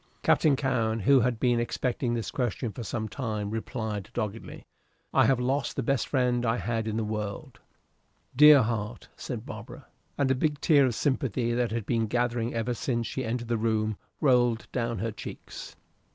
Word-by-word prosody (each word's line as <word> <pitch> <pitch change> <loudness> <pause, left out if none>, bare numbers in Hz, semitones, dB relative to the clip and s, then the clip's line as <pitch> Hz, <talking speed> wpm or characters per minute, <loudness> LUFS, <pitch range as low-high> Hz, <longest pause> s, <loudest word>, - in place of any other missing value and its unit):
Captain 150 -3 +4
Cowen, 115 -5 0
who 135 +6 +5
had 120 -1 0
been 120 -1 +2
expecting 120 +1 -1
this 115 -3 -3
question 120 -2 -2
for 120 - -8
some 110 0 -3
time, 110 -5 -3
replied, 110 -3 -4
doggedly, 110 -1 -5 0.5
"I - - +5
have 135 -2 +3
lost 130 +1 -1
the 135 - -1
best 135 +2 0
friend 125 -3 +1
I 115 0 +1
had 115 -2 -2
in 110 0 -2
the 115 - 0
world." 105 -1 -5 0.8
"Dear 150 -1 +8
heart!" 110 0 -4
said - - -6
Barbara, - - -9 0.3
and 140 -2 +2
a - - +5
big 145 +2 0
tear 145 -5 +5
of 120 - -2
sympathy, 125 -4 0
that 120 -1 +1
had 115 -2 -3
been 115 -1 0
gathering 120 +1 0
ever 115 +2 -1
since 120 -1 -2
she 130 +3 -3
entered 120 +1 -3
the 120 0 0
room, 110 -1 0 0.2
rolled 120 -5 +3
down 115 -2 -1
her 115 0 -2
cheeks. 110 - -9
120 Hz, 180 wpm, -28 LUFS, 110-130 Hz, 0.8 s, Dear